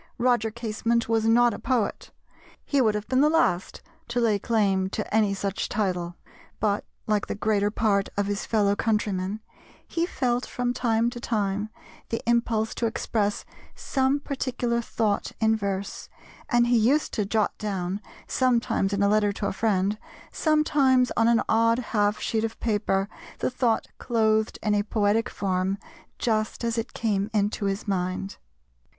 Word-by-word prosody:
Roger 240 -3 +2
Casement 230 +1 -1
was 225 -1 +1
not 235 +1 +4
a - - -6
poet, 245 -6 -1 0.6
he 280 -2 +2
would 215 -3 +3
have 210 0 -4
been 260 +1 +2
the 300 - +5
last 250 - +1 0.2
to 235 +1 -1
lay 220 -4 +2
claim 195 -4 +1
to 210 +1 -4
any 215 -2 +3
such 195 0 -2
title, 180 -4 -1 0.4
but, 205 -1 +1 0.2
like 210 -1 0
the - - -3
greater 205 0 +1
part 205 -2 +1
of 205 - +1
his 205 0 -2
fellow 205 -3 +2
countrymen, 210 -2 -1 0.5
he 335 0 -1
felt 250 -6 0
from 245 0 -2
time 235 -1 +1
to 240 - -7
time 210 -2 -1 0.4
the 230 - -1
impulse 230 -2 +1
to 235 - 0
express 210 -2 -1 0.3
some 265 +1 0
particular 250 -4 -2
thought 220 -3 -1
in 220 0 +3
verse, 200 -2 -4 0.4
and 240 0 +4
he 240 0 +3
used 270 +8 +2
to 210 - 0
jot 210 +1 0
down, 195 -1 -3 0.2
sometimes 235 -6 +1
in 200 0 +1
a - - +4
letter 210 0 +3
to 200 - -4
a - - -1
friend, 200 0 0 0.3
sometimes 285 -5 +3
on 230 - +3
an 235 0 +4
odd 230 +1 +3 0.2
half 210 -1 +2
sheet 220 -1 -1
of 225 0 -3
paper, 205 -3 0 0.3
the - - -1
thought 245 -3 +1
clothed 220 -2 +1
in 210 - +2
a 205 - +3
poetic 215 +3 +1
form 190 0 -1 0.4
just 220 0 -1
as 230 -1 0
it 225 - -6
came 205 -2 0
into 205 0 0
his 195 +2 -2
mind. 185 0 -2
220 Hz, 160 wpm, -26 LUFS, 200-235 Hz, 0.6 s, the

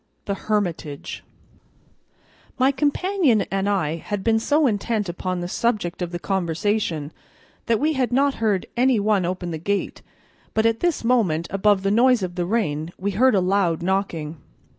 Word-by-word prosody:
The 200 - -1
Hermitage 180 -8 -3 1.3
MY 260 +1 +4
COMPANION 290 - +1
and 195 +1 0
I 165 -6 0
had 200 +3 -4
been 225 -1 +3
so 295 +6 +2
intent 215 -2 0
upon 180 +1 -3
the 175 - -3
subject 205 -4 -1
of 175 -1 -3
the 175 - -3
conversation 175 -3 -1 0.6
that 230 -2 +2
we 310 +2 +1
had 260 -3 0
not 275 +2 +3
heard 205 -4 +1
any 250 -1 +3
one 205 -3 +2
open 180 0 -3
the 160 - -4
gate, 200 +5 -2 0.5
but 220 - +2
at 230 0 +2
this 345 -7 0
moment, 210 -10 +2
above 195 0 +2
the 195 - +1
noise 240 0 +4
of 180 -1 -3
the 175 -1 -2
rain, 165 -7 -1
we 200 +2 -2
heard 245 +4 +3
a - - +4
loud 180 -3 +1
knocking. 175 -5 -2
200 Hz, 165 wpm, -23 LUFS, 175-235 Hz, 1.3 s, MY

